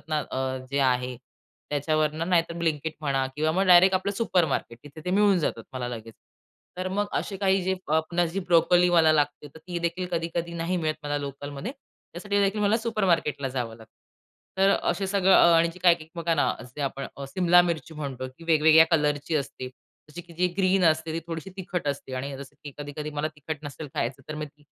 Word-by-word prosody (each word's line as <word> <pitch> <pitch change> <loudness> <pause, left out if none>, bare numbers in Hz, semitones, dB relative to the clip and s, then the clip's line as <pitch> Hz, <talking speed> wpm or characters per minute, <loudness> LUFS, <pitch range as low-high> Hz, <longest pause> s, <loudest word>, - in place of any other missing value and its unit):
ना 155 -1 0 0.5
जे 140 - -1
आहे 125 -1 +1 0.5
त्याच्यावरनं 155 +3 0
नाहीतर 170 -2 +2
ब्लिंकिट 160 -1 -1
म्हणा 135 -3 0
किंवा 155 +1 +1
मग 190 +3 +1
डायरेक्ट 185 +1 +7
आपलं 190 +2 0
सुपरमार्केट 170 - 0
तिथे 145 +2 -11
ते 180 - -2
मिळून 200 0 +4
जातात 115 -8 -2
मला 125 -2 -4
लगेच. 115 -2 -8 0.6
तर 185 0 -2
मग 205 +2 -1
असे 195 - -2
काही 190 -1 +2
जे 190 - 0 0.2
अ, 150 - -1
आपण 170 +2 +1
जी 190 +4 -3
ब्रोकोली 175 0 +4
मला 160 -2 +5
लागते 145 -1 0
तर - - -11
ती 175 +2 -5
देखील 170 +2 -2
कधी-कधी 170 0 -2
नाही 170 +2 -1
मिळत 155 -2 -1
मला 145 0 -2
लोकलमध्ये. 145 - -6 0.4
त्यासाठी 200 +4 -2
देखील 200 +2 +1
मला 210 +2 +3
सुपरमार्केटला 185 - 0
जावं 120 -3 -4
लागतं. 110 -1 -17 0.7
तर 195 +1 +5
असे 200 0 0
सगळं 195 -1 +3
अ, 170 - +7
आणि 165 +1 +4
जे - - -12
काही 175 -2 +6
एक 155 - -12
बघा 170 -1 0
ना, 145 - +2
असे 125 +4 -10
आपण 135 0 -3
अ, 140 - -6
सिमला 175 +2 +4
मिरची 165 -2 -3
म्हणतो 135 -4 -5
की 165 - -12
वेगवेगळ्या 160 0 +6
कलरची 150 0 +1
असते. 130 -2 -4 0.4
जशी 175 - -7
की 170 0 -16
जी 180 +2 +2
ग्रीन 190 -1 +3
असते 160 0 +2
ती 165 - -2
थोडीशी 165 +2 -6
तिखट 180 -4 -4
असते 135 -2 -4
आणि 135 +1 -4
जसं 140 0 -11
की 145 - -7
कधी-कधी 145 +1 -6
मला 150 +1 -2
तिखट 150 +1 -5
नसेल 145 +1 -7
खायचं 125 +3 -2
तर 155 - -4
मी 150 0 -4
ती 145 0 -22
160 Hz, 200 wpm, -26 LUFS, 145-180 Hz, 0.7 s, डायरेक्ट